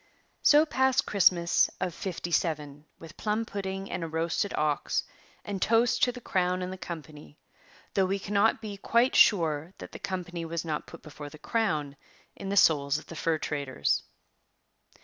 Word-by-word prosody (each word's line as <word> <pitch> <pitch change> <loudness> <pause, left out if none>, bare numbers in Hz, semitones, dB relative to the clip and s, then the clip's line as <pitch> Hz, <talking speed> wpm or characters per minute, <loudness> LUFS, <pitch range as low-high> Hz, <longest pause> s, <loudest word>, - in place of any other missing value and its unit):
So 300 +1 +6
passed 265 -3 +2
Christmas 175 -4 +3
of 180 -2 -2
'57 160 -5 -2
with 165 -1 -13
plum 215 +1 -1
pudding 195 -1 -5
and 180 - -3
a - - -3
roasted 165 +5 -1
ox 150 -1 0 0.4
and 200 -2 -4
toasts 230 +2 +3
to 245 - +3
the 245 - -9
crown 185 -4 0
and 180 +1 -4
the - - -8
company, 155 - -9 0.6
though 190 -1 +2
we 195 +1 0
cannot 205 +3 +1
be 205 -2 -6
quite 235 +5 +2
sure 165 -3 +4
that - - -10
the - - -9
company 180 -2 -4
was 165 0 -4
not 155 -2 -3
put - - -12
before 150 -1 -9
the 155 - -13
crown 155 -7 -1 0.4
in 195 - -6
the 200 - -1
souls 145 -5 +4
of 155 - -9
the 165 - -10
fur 160 +1 0
traders. 140 - -1
180 Hz, 170 wpm, -28 LUFS, 155-200 Hz, 0.6 s, So